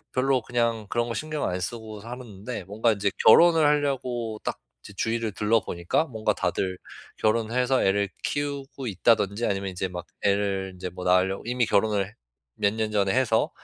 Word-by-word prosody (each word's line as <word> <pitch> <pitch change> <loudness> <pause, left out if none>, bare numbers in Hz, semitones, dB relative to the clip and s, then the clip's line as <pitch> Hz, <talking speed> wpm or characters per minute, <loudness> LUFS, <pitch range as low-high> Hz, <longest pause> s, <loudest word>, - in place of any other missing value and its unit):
벼 130 - +1
별로 135 -1 +3
그냥 115 -2 -1
그런 120 0 0
거 115 - -3
신경 155 +5 -3
안 90 0 -2
쓰고 110 +1 -5
살았는데 115 -2 -7
뭔가 110 +4 +1
이제 100 -1 0 0.2
결혼을 165 +5 +7
하려고 125 -6 0
딱 - - -3 0.2
이제 105 - -11
주위를 115 0 -1
둘러보니까 105 - +1
뭔가 110 -6 -1
다들 95 -1 -2 0.4
결혼해서 115 +4 +1
애를 100 +1 +2
키우고 140 -2 -3
있다든지 105 +1 +2
아니면 100 -1 -1
이제 95 +1 -3
막 90 -1 -7 0.2
애를 100 -1 0
이제 90 - -5
뭐 90 +1 -8
낳으려고 90 +2 +2
이미 125 -1 +1
결혼을 105 -1 +1 0.4
몇 100 0 +2
년 110 -1 -2
전에 100 -2 +2
해서 120 -3 +2
110 Hz, 355 characters per minute, -26 LUFS, 100-125 Hz, 0.4 s, 결혼을